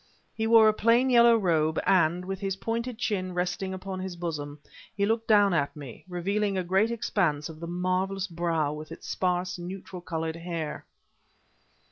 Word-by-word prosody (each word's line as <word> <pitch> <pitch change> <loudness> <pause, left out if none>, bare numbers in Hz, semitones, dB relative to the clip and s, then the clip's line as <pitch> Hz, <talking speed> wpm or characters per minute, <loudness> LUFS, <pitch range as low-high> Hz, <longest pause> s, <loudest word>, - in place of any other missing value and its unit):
He 220 0 -1
wore 225 -1 +7
a 215 - +5
plain 235 +4 +3
yellow 235 -1 +7
robe, 160 -6 +1
and, 180 -1 +3
with 190 0 -4
his 195 -1 -2
pointed 230 +3 -3
chin 185 -6 -2
resting 180 +2 -2
upon 190 0 -5
his 185 -1 -5
bosom, 150 -4 -5 0.4
he 200 - +2
looked 225 +1 0
down 205 -3 +5
at 145 -4 0
me, 140 -5 -10
revealing 195 +3 -1
a 185 - 0
great 190 +5 +2
expanse 175 -10 0
of 160 -1 -10
the 170 - -6
marvelous 185 +2 -1
brow 165 -4 -1
with 155 +1 -8
its 165 - -9
sparse, 180 0 -1
neutral 180 +1 -7
colored 160 -1 -3
hair. 165 -3 -5
185 Hz, 170 wpm, -27 LUFS, 170-200 Hz, 0.4 s, wore